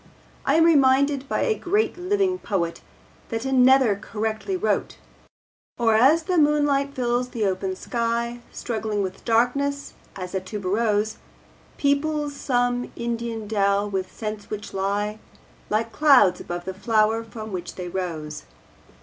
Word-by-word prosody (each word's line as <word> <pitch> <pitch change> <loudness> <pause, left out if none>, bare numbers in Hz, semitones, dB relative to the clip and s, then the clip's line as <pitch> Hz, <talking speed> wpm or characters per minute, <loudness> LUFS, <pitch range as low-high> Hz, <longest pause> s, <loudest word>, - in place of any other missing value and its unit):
I - - +4
am 325 - +5
reminded 280 -3 +4
by - - 0
a 455 - +2
great 415 +1 0
living 370 0 0
poet 170 - -2 0.5
that 225 +1 -3
another 260 -3 +5
correctly 220 - -3
wrote: 425 - -1 0.8
Or 230 -2 +3
as 275 +9 +5
the 360 0 +1
moonlight 290 -2 +2
fills 245 0 0
the 225 -4 -2
open 190 0 -1
sky 235 +2 -2
Struggling 215 -3 -2
with 185 0 -6
darkness 275 +5 +1 0.2
as 185 -2 -6
a 190 - 0
tuberose 210 +2 -1 0.6
Peoples 290 +1 0
some 245 -2 0
Indian 235 -2 -3
dell 200 -1 +1
with 190 -2 -3
scents 215 -2 -6
which 210 0 -6
lie 205 +2 -1 0.5
Like 225 +2 0
clouds 275 -11 +5
above 175 0 -6
the 190 - -4
flower 220 +2 +1
from 220 -1 -8
which 180 -2 -5
they 180 -1 -5
rose. 165 - -5
230 Hz, 135 wpm, -24 LUFS, 205-280 Hz, 0.8 s, am